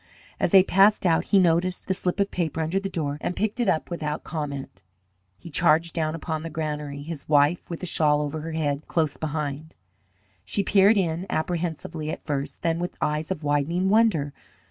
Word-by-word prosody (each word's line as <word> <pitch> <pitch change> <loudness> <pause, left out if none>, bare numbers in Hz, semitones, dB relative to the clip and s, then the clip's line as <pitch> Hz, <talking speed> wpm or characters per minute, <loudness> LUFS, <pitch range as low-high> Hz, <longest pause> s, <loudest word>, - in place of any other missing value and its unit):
As - - +2
they 190 -2 +7
passed 195 +2 +4
out 165 -2 +3
he 200 - +3
noticed 180 0 +2
the 190 - +1
slip 180 +1 -2
of 200 0 +1
paper 165 -2 -2
under 160 +5 0
the 195 0 -4
door 150 -5 -3
and 180 - -2
picked 215 +3 -1
it 235 -5 +2
up, 160 - +1
but - - -23
without 155 -3 -3
comment. 140 - -5 0.6
He 165 - -11
charged 160 +3 +3
down 155 -1 -1
upon 160 -1 -4
the 165 - -5
granary, 150 -2 -4
his 155 -2 -7
wife, 145 +3 +3
with 170 +1 -6
a - - 0
shawl 150 -3 +2
over 150 +1 -3
her 160 +1 -5
head, 145 -2 -2
close 155 -4 0
behind. 155 0 -4 0.7
She 100 - -1
peered 200 +2 +5
in, 175 0 -1
apprehensively 160 -1 -3
at - - -5
first, 140 -2 -4
then 165 0 +1
with 175 +1 -4
eyes 150 +1 -1
of 180 -5 -3
widening 150 +6 +1
wonder. 195 -10 +3
160 Hz, 195 wpm, -25 LUFS, 150-180 Hz, 0.7 s, they